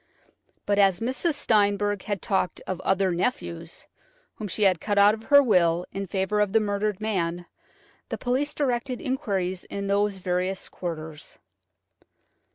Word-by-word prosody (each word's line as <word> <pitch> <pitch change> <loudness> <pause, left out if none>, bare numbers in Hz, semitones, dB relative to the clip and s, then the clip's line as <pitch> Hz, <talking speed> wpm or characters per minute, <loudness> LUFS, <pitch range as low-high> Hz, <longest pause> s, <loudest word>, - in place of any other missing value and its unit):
But 205 0 +1
as 195 -3 +4
Mrs. 260 +7 -1
Steinberg 205 -4 +2
had 205 -3 -3
talked 190 -2 0
of 185 -1 -4
"other 190 -1 +1
nephews," 170 -4 -3 0.5
whom 215 - -6
she 210 +3 -1
had 185 -4 +3
cut 205 -1 -1
out 200 +1 +7
of 220 0 -7
her 285 -1 +7
will 175 -6 +3
in 195 0 -4
favour 190 +3 -1
of 205 -2 +1
the 225 - +5
murdered 205 -1 -1
man, 175 -5 -2 0.6
the - - -3
police 260 +4 -1
directed 255 -2 -1
inquiries 190 -8 -2
in 200 0 -5
those 200 0 +1
various 185 +1 -2
quarters. 160 -3 -7
200 Hz, 150 wpm, -26 LUFS, 185-215 Hz, 0.6 s, out